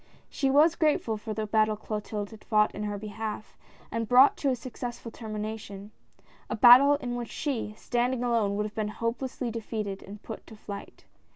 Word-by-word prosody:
She 275 - 0
was 300 +4 +5
grateful 300 -9 +1
for 215 0 -6
the 220 - -2
battle 215 0 +2
Clotilde 210 -1 -4
had 220 - -13
fought 210 -2 +2
in 210 - -6
her 205 -1 -3
behalf, 215 +1 -6 0.4
and 230 0 -2
brought 255 +3 +7
to 280 - 0
a 260 - +2
successful 240 -1 -7
termination 215 -2 -6 0.3
— - - -30
a - - -1
battle 255 +5 +8
in 250 -4 -4
which 240 -1 -4
she, 245 -8 -3
standing 245 +1 0
alone, 225 -5 +1
would 210 +1 -1
have 210 - -6
been 215 -1 -2
hopelessly 235 +3 -3
defeated 215 -3 -4
and 205 +2 -11
put 220 - -8
to 220 - -11
flight. 205 -1 -9
220 Hz, 185 wpm, -28 LUFS, 210-245 Hz, 0.4 s, battle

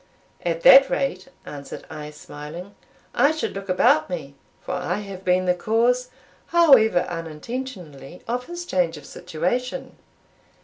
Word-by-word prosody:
"At 165 -1 -1
that 270 +6 +8
rate," 190 -9 -2 0.2
answered 140 -1 -9
I, 150 -2 -8
smiling, 150 +5 -10 0.4
"I 285 - +4
should 315 0 -2
look 195 0 -7
about 155 -3 +3
me; 155 -6 -5 0.3
for - - -7
I 180 0 -2
have 195 -2 -7
been 185 0 +2
the 180 - +3
cause, 235 +6 +1 0.4
however 270 - +5
unintentionally, 170 - -7
of 245 +2 -3
his 345 0 -6
change 175 - 0
of 145 - -12
situation." 245 - -3
185 Hz, 135 wpm, -23 LUFS, 165-250 Hz, 0.4 s, that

